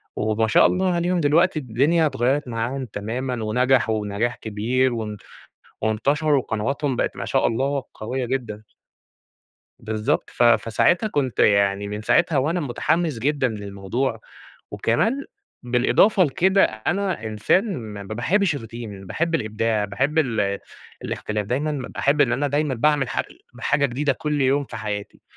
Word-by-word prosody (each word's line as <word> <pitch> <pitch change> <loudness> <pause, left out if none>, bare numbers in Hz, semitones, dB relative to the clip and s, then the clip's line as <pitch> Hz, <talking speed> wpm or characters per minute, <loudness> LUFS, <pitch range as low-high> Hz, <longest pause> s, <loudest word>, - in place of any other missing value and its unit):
وما 110 +1 0
شاء - - +5
الله 185 -1 +2
عليهم 175 +1 +1
دلوقتي 160 +2 +3
الدنيا 145 +7 +2
اتغيَّرت 135 +1 0
معاهم 120 +3 -3
تمامًا 115 +3 -4
ونجحوا 110 -2 +1
نجاح 115 +4 -1
كبير 120 +4 0
وان 105 -2 -4 0.6
وانتشروا 140 +7 +1
وقنواتهم 130 +4 -2
بقت- - - -1
ما - - -4
شاء - - +1
الله- 135 +3 -1
قويّة 125 +3 -3
جدًا. 115 -5 -3 1.2
بالضبط، 110 0 -1
ف 120 - +1
فساعتها 120 - +3
كنت 140 - -2
يعني 100 0 +3
من 105 +1 -5
ساعتها 155 +6 +2
وأنا 160 +7 +1
متحمّس 155 +1 -1
جدًا 140 +1 +1
للموضوع، 105 +3 -3 0.5
وكمان 220 - 0 0.4
بالإضافة 125 - +3
لكده 190 +6 +3
أنا 170 - -1
إنسان 175 - +1
ما 105 -3 -7
ما 100 - -6
باحبش 160 - +1
الRoutine 130 - -6
ال 105 -5 -7
باحب 165 - -1
الإبداع، 110 -3 0
باحب 135 +11 -1
ال 110 -8 0 0.4
الاختلاف، 105 -1 -3
دايمًا 145 +7 -1
ب 135 -3 -5
باحب 145 +2 +2
إن 125 -4 +3
أنا 145 +3 0
دايمًا 145 0 0
باعمل 140 +1 +2
حاج - - -1
ال 345 - -19 0.2
حاجة 145 -1 +2
جديدة 140 +3 0
كل 150 +2 -2
يوم 135 +2 +2
في - - -8
حياتي. 105 -1 -5
125 Hz, 145 wpm, -23 LUFS, 110-150 Hz, 1.2 s, شاء